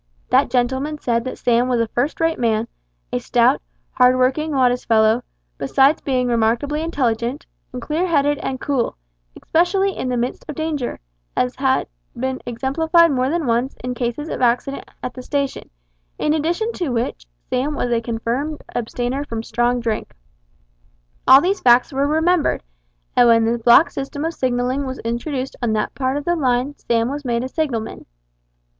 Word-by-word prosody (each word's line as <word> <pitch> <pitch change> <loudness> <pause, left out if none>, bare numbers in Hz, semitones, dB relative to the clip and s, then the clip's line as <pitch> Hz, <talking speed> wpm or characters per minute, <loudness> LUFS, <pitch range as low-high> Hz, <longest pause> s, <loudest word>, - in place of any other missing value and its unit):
That 265 +1 +4
gentleman 260 +5 0
said 235 -4 -1
that 260 - -5
Sam 240 +1 +2
was 250 -2 +1
a 230 - +1
first 260 +7 -1
rate 325 0 +1
man, 225 -1 +1 0.5
a - - +1
stout, - - +2 0.3
hard 250 0 +4
working, 270 +5 +1
modest 250 -3 +1
fellow, 220 +1 +4 0.4
besides 270 - +3
being 255 -2 0
remarkably 240 +6 +1
intelligent, 255 -4 -1 0.3
and 250 - -5
clear 310 +8 -1
headed 290 -3 +2
and 260 -1 -3
cool, 275 -5 -1 0.4
especially 380 +3 +1
in 255 - -3
the 250 - 0
midst 240 +2 -2
of 300 - -4
danger, 310 -5 -3 0.4
as 250 0 0
had 265 -1 +1 0.3
been 260 +1 -2
exemplified 320 +7 +2
more 260 -1 +1
than 330 0 -1
once 240 +2 0
in 250 0 -2
cases 245 +5 -3
of - - -4
accident 250 +3 0
at 250 - -4
the 255 - -8
station, 280 +1 -3 0.5
in 300 - +1
addition 340 +9 0
to 345 -8 -3
which 230 - -3 0.2
Sam 285 +4 0
was 245 - -1
a 230 -1 +2
confirmed 240 +6 -3
abstainer 245 +3 -2
from 230 -5 -5
strong 240 +2 0
drink. 225 -2 -3 1.1
All 265 +1 +9
these 385 +5 0
facts 245 +3 +4
were 275 +1 +1
remembered, 320 +2 +1 0.5
and 245 - +6
when 230 -1 +5
the 235 +1 0
block 240 +7 +6
system 285 +2 -4
of 330 - -2
signalling 255 0 -1
was 260 0 -5
introduced 255 +3 -3
on 235 -3 0
that 215 -1 -1
part 265 +1 -1
of 290 - -5
the 345 - +2
line 260 -1 0
Sam 230 -3 0
was 290 +1 -5
made 240 -2 -1
a - - -2
signalman. 260 -7 -3
255 Hz, 170 wpm, -20 LUFS, 240-290 Hz, 1.1 s, All